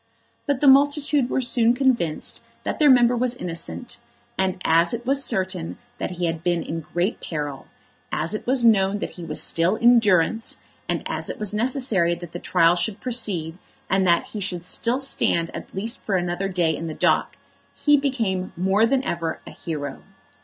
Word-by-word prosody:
But 285 -2 0
the 290 - +4
multitude 285 -1 +4
were 260 - 0
soon 240 -1 +3
convinced 240 - 0 0.2
that - - -3
their 300 -2 +5
member 245 -2 +5
was 245 0 0
innocent; 165 - -6 0.4
and 190 -1 -1
as 170 +6 +4
it 235 +1 -9
was 275 +1 +2
certain 185 -3 -2 0.2
that - - -2
he 175 - -1
had 165 -1 -3
been 175 -2 0
in 165 - -4
great 175 +7 -2
peril, 145 -4 -5 0.4
as 165 +4 -2
it 215 - -5
was 255 -1 +2
known 200 -3 +4
that - - -5
he 175 - -10
was 155 -2 -3
still 170 +5 +2
in 240 +1 +5
durance, 210 +1 +1 0.3
and - - -1
as - - -3
it - - -5
was 210 -1 -3
necessary 220 -7 +2
that 175 -1 -10
the 175 - -6
trial 170 -1 +3
should 200 +4 -2
proceed, 190 -9 -2 0.3
and 190 -1 +2
that 170 -1 +2
he 215 - -6
should 180 -3 -3
still 240 +7 0
stand 170 -10 0
at - - -8
least 220 +4 -3
for 200 - -1
another 175 +1 -1
day 175 -4 +1
in 165 - -5
the 155 - -5
dock, - - +1 0.4
he 295 -1 +4
became 225 -11 -1
more 195 +5 +3
than 265 +2 +1
ever 165 -7 -3
a - - -10
hero. 145 -4 -6
190 Hz, 190 wpm, -23 LUFS, 170-240 Hz, 0.4 s, their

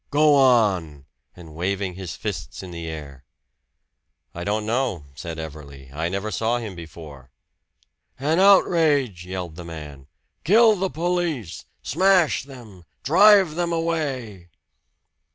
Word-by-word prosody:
Go 150 +1 +4
on!" 100 - +2 0.3
and 80 -3 -13
waving 95 +3 -2
his 90 -2 -7
fists - - -6
in 90 - -9
the 85 -1 -7
air. 75 -4 -8 1.1
"I 85 - -6
don't 105 +2 -1
know," 115 - -1
said 80 +3 -7
Everley. 70 -4 -9
"I 80 +3 -2
never 100 +3 -3
saw 115 +5 0
him 110 -5 -6
before." 80 -5 -11 0.9
"An 155 +6 0
outrage!" 150 - +3
yelled 90 -3 -6
the 90 - -7
man. 75 -5 -10 0.4
"Kill 220 +6 +5
the 190 0 -2
police! 165 - -3 0.2
Smash 185 -7 +2
them! 115 -10 -13 0.2
Drive 195 +1 +6
them 170 +1 -2
away!" 140 - -3
100 Hz, 125 wpm, -23 LUFS, -, 1.1 s, Drive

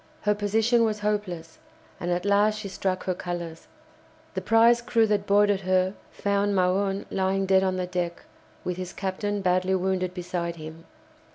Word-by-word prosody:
Her 210 - +2
position 220 +3 +2
was 215 -2 0
hopeless, 185 -6 -3 0.4
and 175 - -3
at 175 +1 -1
last 205 +1 +3
she 210 -1 -5
struck 185 -1 -2
her 185 - 0
colours. 175 -2 -6 0.7
The - - -3
prize 230 +1 +5
crew 230 -1 +2
that 205 -1 0
boarded 205 -1 +4
her 185 0 +2 0.2
found 200 0 0
Magon 195 +2 +1
lying 195 0 0
dead 190 0 +4
on 190 -1 0
the 185 -1 -1
deck, 180 -1 -3 0.4
with 180 -1 -3
his 185 0 -5
captain, 200 +1 -2
badly 185 +1 +2
wounded, 185 -1 -1
beside 175 -1 -3
him. 160 0 -10
190 Hz, 165 wpm, -26 LUFS, 180-205 Hz, 0.7 s, prize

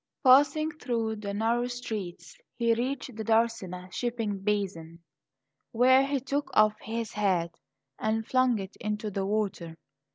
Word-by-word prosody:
Passing 290 +4 +5
through 225 -5 -2
the 205 -1 -5
narrow 230 +4 0
streets 225 - -6 0.2
he 235 -1 +3
reached 255 +1 -3
the 220 - -4
Darsena 215 -5 0
shipping 230 -5 -2
basin, 190 -5 -2 0.8
where 260 +3 +5
he 275 0 0
took 280 +3 -2
off 215 0 +5
his 225 0 -4
hat 185 -5 0 0.5
and 220 +1 -1
flung 255 -1 +2
it 195 -1 -7
into 210 -1 -3
the 195 0 -2
water. 195 -6 -2
220 Hz, 135 wpm, -28 LUFS, 200-245 Hz, 0.8 s, Passing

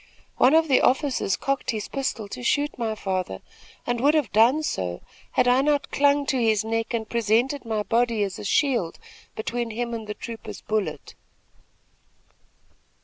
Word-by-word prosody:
One 265 +5 +5
of 320 0 +4
the 265 -3 +4
officers 260 -7 +1
cocked 275 -1 -2
his 215 -3 -2
pistol 265 -6 -3
to 245 - -7
shoot 290 +4 0
my 225 -3 -2
father 185 - -3 0.4
and 240 -1 -1
would 290 +4 +4
have 295 -9 +1
done 240 +9 +4
so, 90 - -2 0.3
had 250 - +3
I 250 +2 +5
not 290 0 0
clung 285 0 +3
to 265 -2 0
his 220 -2 +2
neck 225 0 -2
and 220 -1 -3
presented 235 +5 +1
my 220 -2 -1
body 230 -1 +1
as 195 -2 -4
a - - -7
shield 230 - +1 0.4
between 235 +2 -3
him 235 +2 -3
and 225 -2 -5
the 210 - -5
trooper's 230 -2 -8
bullet. 215 -2 -3
235 Hz, 165 wpm, -25 LUFS, 215-275 Hz, 0.4 s, One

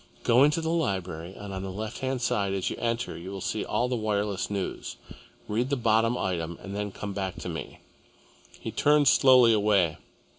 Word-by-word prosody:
Go 125 +3 +5
into 150 +3 +3
the 160 0 -1
library, 95 - -2
and 100 -1 -8
on 95 - -4
the 95 - -5
left 110 +4 -5
hand 130 -2 -2
side 100 -4 0
as 95 -2 -1
you - - -3
enter 115 +1 -2
you 85 +3 -8
will 100 0 -6
see 105 +3 -2
all 120 - 0
the 125 - -1
wireless 105 -3 -1
news. 100 -2 -4 0.5
Read 120 +5 0
the 140 - +1
bottom 115 0 +2
item 85 -3 -2
and 100 +1 -6
then 105 0 -3
come 100 +1 -6
back 95 -2 -3
to - - -6
me." - - -7 0.8
He - - -5
turned 150 -1 +3
slowly 125 -3 +6
away. 100 -6 +2
105 Hz, 195 wpm, -27 LUFS, 95-120 Hz, 0.8 s, slowly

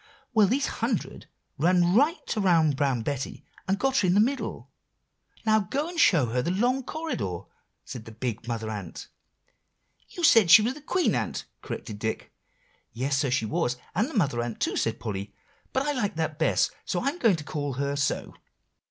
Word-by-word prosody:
Well, 215 -3 +5
these 270 +7 +1 0.2
hundred - - -2 0.3
ran 175 0 +3
right 290 - +2
around 170 -8 +3
Brown 135 -4 0
Betty, 140 +1 -4 0.2
and 195 +1 +1
got 270 +3 +1
her 190 - +3
in 180 - +3
the - - +5
middle. 260 +6 -1 0.7
"'Now, 220 0 +4
go 275 - -2
and 345 -1 -5
show 165 - +5
her 125 +2 0
the 165 - -2
long 245 +8 +1
corridor,' 110 - -4 0.4
said 115 -3 -8
the 115 - -10
big 115 0 -4
Mother 115 -2 -3
Ant." 100 -6 -7 1.0
"You 350 - -7
said 225 - +6
she 210 +5 +9
was 240 +4 0
the 300 - -12
Queen 360 +4 +1
Ant," - - -2 0.2
corrected 105 -3 -6
Dick. 110 +1 -4 0.6
"Yes, 135 +3 -1
so 140 -2 +1
she 125 -2 +1
was, 120 +3 -1 0.2
and 215 - +1
the 320 - -9
Mother 140 - +1
Ant 120 -2 -5
too," - - 0
said 115 0 -1
Polly; 100 -2 -5 0.4
"but 265 - 0
I 295 - +1
like 225 - -1
that 160 -1 -2
best, 160 - +2
so 175 - -2
I'm 285 +6 -2
going 225 -6 +4
to 155 - -7
call 145 -2 -3
her 140 +2 -2
so. 140 -1 -1
165 Hz, 185 wpm, -27 LUFS, -, 1.0 s, she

